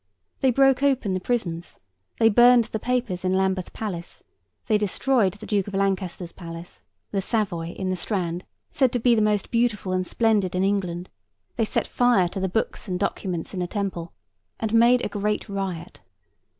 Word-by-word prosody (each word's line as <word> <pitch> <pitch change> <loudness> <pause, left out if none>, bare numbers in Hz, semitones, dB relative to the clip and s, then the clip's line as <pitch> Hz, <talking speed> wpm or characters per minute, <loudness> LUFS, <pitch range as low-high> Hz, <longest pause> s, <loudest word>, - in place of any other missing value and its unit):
They 265 - +3
broke 270 +1 +4
open 265 -8 +2
the 185 - 0
prisons; 180 -6 -3 0.4
they 225 - +5
burned 240 +1 +6
the 220 - -4
papers 240 -7 -1
in 185 0 +1
Lambeth 190 -1 0
Palace; 180 -6 -6 0.4
they 215 -2 +2
destroyed 210 0 +1
the 210 +1 -10
Duke 200 -2 0
of 200 - -5
Lancaster's 190 -3 -1
Palace, 170 0 -9 0.3
the 195 - 0
Savoy, 185 -6 -1
in 190 -1 -2
the - - 0
Strand, 180 -3 -2 0.3
said 260 -3 +2
to 245 - +1
be 240 +1 +4
the 220 - +3
most 210 -2 +1
beautiful 230 -5 +1
and 185 0 0
splendid 210 -6 +1
in 185 - +1
England; 185 -3 -1 0.4
they 225 - +1
set - - -1
fire 245 -7 +3
to 190 - -5
the 190 0 -1
books 220 +3 -2
and 180 -1 -2
documents 185 -4 -3
in 185 - -4
the 180 - -1
Temple; 185 -4 -3 0.5
and 220 -1 -2
made 240 +2 +5
a - - +1
great 210 +2 -2
riot. 190 -4 -5
200 Hz, 180 wpm, -24 LUFS, 185-225 Hz, 0.5 s, burned